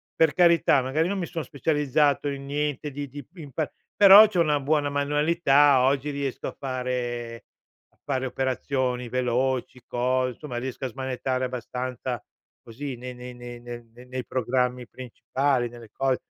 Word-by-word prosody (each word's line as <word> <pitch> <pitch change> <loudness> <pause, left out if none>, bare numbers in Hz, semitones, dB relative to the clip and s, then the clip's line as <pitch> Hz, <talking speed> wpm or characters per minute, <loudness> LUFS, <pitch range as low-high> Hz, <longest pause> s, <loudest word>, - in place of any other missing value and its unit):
per 160 -2 +3
carità, 170 -6 +5
magari 150 +6 0
non 200 0 -2
mi 175 - -1
son 165 -2 -4
specializzato 145 +1 +1
in 140 -1 -5
niente 145 0 -2
di 145 +1 -5
di 140 0 -9
in 150 -5 -10
pa 150 +3 -2 0.2
però 205 +2 +10
c'ho 185 -5 +1
una 150 -3 +2
buona 145 +1 +1
manualità. 145 -1 +3
Oggi 135 +2 +1
riesco 140 -2 -3
a - - -6
fare 125 -3 -4 0.4
a - - -37
fare 130 -2 -1
operazioni 130 -1 -1
veloci, 125 +1 -1
cos 125 0 0
insomma, 145 -6 -6
riesco 130 +2 -4
a - - 0
smanettare 130 0 -2
abbastanza, 125 0 -4 0.4
così, 130 +3 -6
nei 125 +1 -7
nei 125 0 -9
nei 120 0 -9
nei 120 0 -8 0.2
nei 130 0 -5
programmi 125 -1 -1
principali, 130 +1 -1
nelle 120 -2 -12
cos 135 +1 0
130 Hz, 155 wpm, -26 LUFS, 125-145 Hz, 0.4 s, però